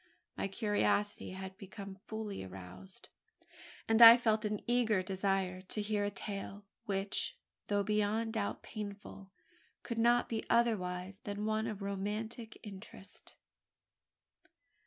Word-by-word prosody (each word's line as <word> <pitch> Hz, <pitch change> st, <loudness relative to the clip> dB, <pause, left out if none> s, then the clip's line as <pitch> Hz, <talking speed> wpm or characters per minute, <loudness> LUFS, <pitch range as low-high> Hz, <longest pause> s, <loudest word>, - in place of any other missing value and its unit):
My -, -, -1 dB
curiosity 205 Hz, 0 st, 0 dB
had 190 Hz, 0 st, -7 dB
become 195 Hz, -1 st, -8 dB
fully 220 Hz, -, -4 dB
aroused; 95 Hz, 0 st, -10 dB, 0.8 s
and 225 Hz, +1 st, +4 dB
I 230 Hz, +1 st, +13 dB
felt 220 Hz, -3 st, +1 dB
an 210 Hz, -1 st, -1 dB
eager 230 Hz, -5 st, +2 dB
desire 190 Hz, -1 st, 0 dB
to 190 Hz, +3 st, -3 dB
hear 210 Hz, 0 st, 0 dB
a 205 Hz, -, +1 dB
tale, 200 Hz, 0 st, -6 dB, 0.2 s
which, 195 Hz, 0 st, -1 dB, 0.3 s
though 205 Hz, -1 st, +2 dB
beyond 215 Hz, +2 st, +1 dB
doubt 210 Hz, -3 st, -2 dB
painful, 200 Hz, -2 st, -7 dB, 0.5 s
could 235 Hz, -2 st, -3 dB
not 240 Hz, +1 st, +4 dB
be 225 Hz, -1 st, -2 dB
otherwise 190 Hz, -5 st, +1 dB
than 205 Hz, 0 st, -3 dB
one 220 Hz, +1 st, 0 dB
of 210 Hz, -3 st, -5 dB
romantic 210 Hz, +3 st, -4 dB
interest. 195 Hz, -1 st, -9 dB
205 Hz, 120 wpm, -34 LUFS, 195-220 Hz, 0.8 s, I